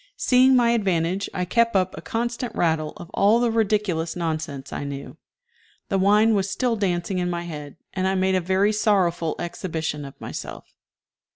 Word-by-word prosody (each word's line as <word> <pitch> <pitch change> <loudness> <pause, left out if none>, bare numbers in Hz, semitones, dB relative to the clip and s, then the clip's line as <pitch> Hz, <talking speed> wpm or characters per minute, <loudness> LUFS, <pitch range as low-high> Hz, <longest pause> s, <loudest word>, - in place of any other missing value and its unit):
Seeing 260 - +5
my 240 -2 +4
advantage, 190 -3 0
I 180 -2 -2
kept 230 +4 +2
up 185 -1 +1
a - - -8
constant 235 0 -3
rattle 160 -2 0
of 175 - -11
all 210 +4 +4
the 240 -1 +2
ridiculous 205 -7 0
nonsense 155 -5 -4
I - - -4
knew. 140 -1 -7 0.7
The 195 -3 +1
wine 210 +3 +4
was 195 -2 +1
still 240 +3 0
dancing 185 -2 -1
in 180 0 -1
my 175 0 -3
head, 150 -3 -8 0.2
and 190 0 0
I 190 - +1
made 190 0 +2
a 185 - +2
very 190 +4 +2
sorrowful 190 -6 +1
exhibition 160 -3 -4
of 140 -1 -11
myself. - - -7
190 Hz, 175 wpm, -24 LUFS, 165-215 Hz, 0.7 s, Seeing